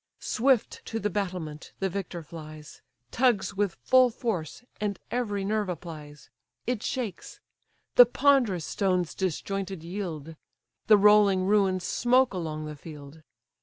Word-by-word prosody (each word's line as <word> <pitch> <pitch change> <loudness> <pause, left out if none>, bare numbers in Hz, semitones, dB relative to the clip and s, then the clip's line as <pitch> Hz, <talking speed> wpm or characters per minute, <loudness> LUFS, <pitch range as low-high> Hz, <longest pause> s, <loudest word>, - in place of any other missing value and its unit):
Swift 255 -1 +1
to 225 - -4
the 210 -1 -2
battlement 180 -6 -4
the 195 - -1
victor 180 -2 -5
flies, 155 -2 -11 0.3
Tugs 220 -6 +2
with 200 -2 -1
full 255 -1 +5
force, 220 - -4 0.2
and 205 -2 -2
every 205 -5 -1
nerve 210 -1 -1
applies: 150 -4 -8 0.3
It 245 -3 -1
shakes; 230 -9 -5 0.6
the 245 - +10
ponderous 250 - +2
stones 180 -4 0
disjointed 190 0 -3
yield; 165 -4 -6 0.5
The 215 - +7
rolling 205 -2 +5
ruins 195 -2 +2
smoke 250 +4 +2
along 155 -4 -4
the 150 0 -6
field. 150 0 -11
195 Hz, 130 wpm, -27 LUFS, 165-215 Hz, 0.6 s, the